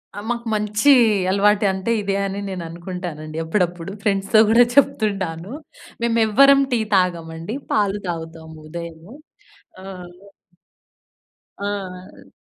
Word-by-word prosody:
అ! - - -10
మాకు 235 -1 -3
మంచి 210 +5 +2 0.4
అలవాటు 205 +2 +3
అంటే, 190 +4 -3
ఇదే 200 -1 -1
అని 195 +1 -4
నేను 185 -2 -5
అనుకుంటానండి 170 -3 -7
అప్పుడప్పుడు. 175 +1 -2
ఫ్రెండ్స్‌తో 200 +1 +2
కూడా 235 +2 +6
చెప్తుంటాను. 195 -9 +1 0.5
మేము 235 -1 +1
ఎవ్వరం 275 +5 +6
టీ 235 - +2 0.2
తాగమండి 170 +1 -1 0.2
పాలు 205 -1 +1
తాగుతాము 160 -1 -7
ఉదయము. 170 +4 -9 0.7
ఆ! - - -12 1.8
ఆ! 195 -2 -6
190 Hz, 105 wpm, -21 LUFS, 170-210 Hz, 1.8 s, కూడా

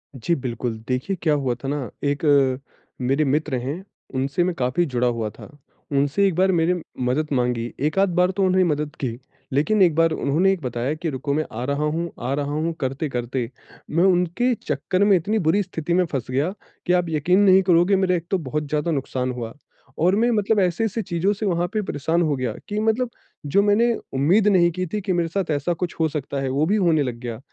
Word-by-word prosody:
जी 130 +8 0
बिल्कुल, 120 -4 -3
देखिए 130 +10 -1
क्या 155 -3 +2
हुआ 135 -4 0
था 135 - -3
ना 140 -3 -2
एक 145 +2 -1 0.8
मेरे 135 +5 +2
मित्र 145 0 0
हैं 150 +9 -4 0.3
उनसे 140 +6 0
मैं 180 0 0
काफ़ी 130 +6 +1
जुड़ा 125 -4 0
हुआ 115 -3 -1
था। - - -13 0.4
उनसे 145 +7 +2
एक 185 - -1
बार 190 +2 +3
मेरे 170 0 +1 0.2
मदद 130 +5 0
माँगी, 120 -2 -1
1 155 +7 0
आध 195 -1 +4
बार 180 +1 +3
तो 195 +1 -1
उन्होंने 185 0 +3
मदद 150 -1 -2
की। 120 -4 -3 0.4
लेकिन 190 +9 +2
1 170 -4 +5
बार 165 0 +3
उन्होंने 175 +7 +2
बताया 125 +3 -2
कि 160 +1 -3
रुको 140 +1 -3
मैं 155 +1 0
आ 120 - -3
रहा 140 +2 -1
हूँ 165 +2 -1 0.2
आ - - +1
रहा 145 0 -2
हूँ 160 +2 -1
करते-करते 130 -3 -2 0.4
मैं 165 +3 +2
उनके 185 +6 +2
चक्कर 185 +2 0
में 205 -1 +5
इतनी 210 +6 -1
बुरी 175 +4 +2
स्थिति 170 -2 -3
में 180 0 +3
फँस 135 -6 -3
गया 145 +8 0 0.3
कि 180 - +2
आप 180 -1 +2
यकीन 160 +5 +2
नहीं 190 -2 +6
करोगे 180 +2 +4
मेरा 185 -1 +2
एक 170 -1 -3
तो 190 - +3
बहुत 150 -1 -3
ज़्यादा 150 +2 0
नुकसान 130 -3 -2
हुआ, 115 -2 -6 0.4
और 180 +4 +3
मैं 235 +3 +2
मतलब 210 -1 +2
ऐसे-ऐसे 195 +5 0
चीज़ों 175 +2 0
से 205 +1 -4
वहाँ 175 -2 +1
पे 215 - +1
परेशान 165 -1 -1
हो 155 -3 +1
गया 125 -4 -2 0.2
कि 210 - -1
मतलब 225 +3 +1 0.4
जो 195 +8 +3
मैंने 230 +3 +3 0.2
उम्मीद 175 +11 +3
नहीं 180 -4 +5
की 185 +2 -3
थी 210 - -3
कि 185 -1 -1
मेरे 170 -1 +1
साथ 180 -2 -2
ऐसा 150 +4 0
कुछ 175 +1 -4
हो 160 - +3
सकता 140 -2 -4
है 135 - -1
वो 140 +4 +1
भी 205 +5 +2
होने 170 -7 +3
लग 125 -3 -3
गया। 120 -2 -6
160 Hz, 215 wpm, -23 LUFS, 135-185 Hz, 0.8 s, नहीं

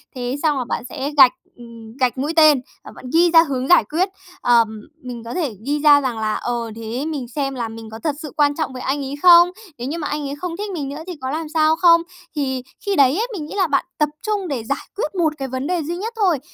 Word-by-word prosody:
Thế 250 0 -3
xong 300 -3 +2
là 255 - -2
bạn 240 - -3
sẽ 280 +4 -4
gạch, 260 -3 +9 0.3
ừm, 230 -1 -12
gạch 255 0 +1
mũi 290 +5 -2
tên, 305 -5 +6 0.2
và - - -11
bạn - - -12
ghi 340 +1 +5
ra 330 -1 +8
hướng 265 -4 -3
giải 355 -7 +6
quyết. 335 - -1 0.3
Ờm, 225 -3 +2 0.2
mình 245 -2 -7
có 230 - -7
thể 295 - -2
ghi 290 +2 0
ra 290 -1 +6
rằng 250 -4 -2
là 215 -1 0
"Ờ, 235 -2 -3
thế 230 +5 -4
mình 290 -6 -4
xem 275 +2 -3
là 235 -2 -3
mình 225 0 -9
có 220 +1 -9
thật 305 -3 0
sự 300 -5 -7
quan 290 -1 +3
trọng 310 -4 -3
với 255 - -7
anh 280 +2 -1
ấy 275 - -5
không? 345 0 +8 0.3
Nếu 245 +2 -5
như 315 - -3
mà 305 -3 -3
anh 300 - -3
ấy 280 - -4
không 335 +3 -5
thích 415 0 -4
mình 290 -6 -4
nữa 285 +3 -6
thì 365 - -4
có 260 - -3
làm 315 0 -4
sao 315 0 +3
không?" 335 0 +5 0.3
Thì 265 -3 -2 0.2
khi 400 -1 0
đấy 275 -1 +4
ấy, 455 +3 0
mình 330 -7 -5
nghĩ 310 - -8
là 380 -3 +2
bạn 280 -2 +1
tập 300 -1 +2
trung 415 -3 -2
để 265 -7 -3
giải 275 +5 -4
quyết 390 -3 -3
1 325 -4 +1
cái 270 - -4
vấn 260 +2 -4
đề 350 -2 -1
duy 340 +4 -4
nhất 440 +5 -4
thôi. 375 -9 +2
285 Hz, 270 wpm, -20 LUFS, 250-330 Hz, 0.3 s, gạch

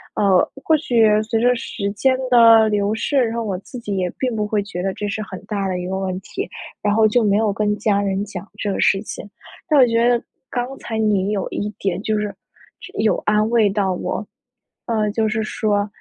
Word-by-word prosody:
呃， 195 -3 +3
或 320 - +4
许 240 -7 +2 0.2
随 225 +1 -1
着 245 +2 +3
时 210 -3 -4
间 260 +5 +2
的 230 -2 +7
流 205 0 +1
逝， 280 +6 -1
然 230 -1 -2
后 230 - -1
我 200 -4 -2
自 250 +6 -10
己 210 -4 -4
也 185 -1 0
并 250 -3 -1
不 210 -1 -1
会 210 -1 0
觉 185 -3 -6
得 195 +1 -1
这 210 - -3
是 215 +1 -3
很 195 -3 -7
大 200 -2 -2
的 185 -1 -2
一 180 0 -4
个 190 +1 -2
问 185 -1 -3
题， - - -6 0.3
然 205 - +1
后 220 0 +5
就 230 +2 +2
没 205 -1 +3
有 215 -2 +1
跟 210 0 0
家 205 -1 +1
人 200 0 -1
讲 200 -1 -8
这 205 - -2
个 - - -3
事 195 - +3
情。 205 - -8 0.4
但 300 -2 +5
我 255 - +8
觉 230 0 +2
得 240 -1 +3 0.3
刚 245 +2 -3
才 225 - -5
你 205 -3 +1
有 205 -2 -1
一 205 - -3
点 190 -1 -2
就 215 0 0
是， 210 -1 -2 0.5
就 385 +2 -11
有 220 - +3
安 215 0 +3
慰 225 -3 +4
到 195 -2 0
我， 180 - -3 0.6
呃， 215 -3 0
就 220 0 0
是 215 +1 -1
说， 205 -1 0
210 Hz, 245 characters per minute, -20 LUFS, 200-230 Hz, 0.6 s, 我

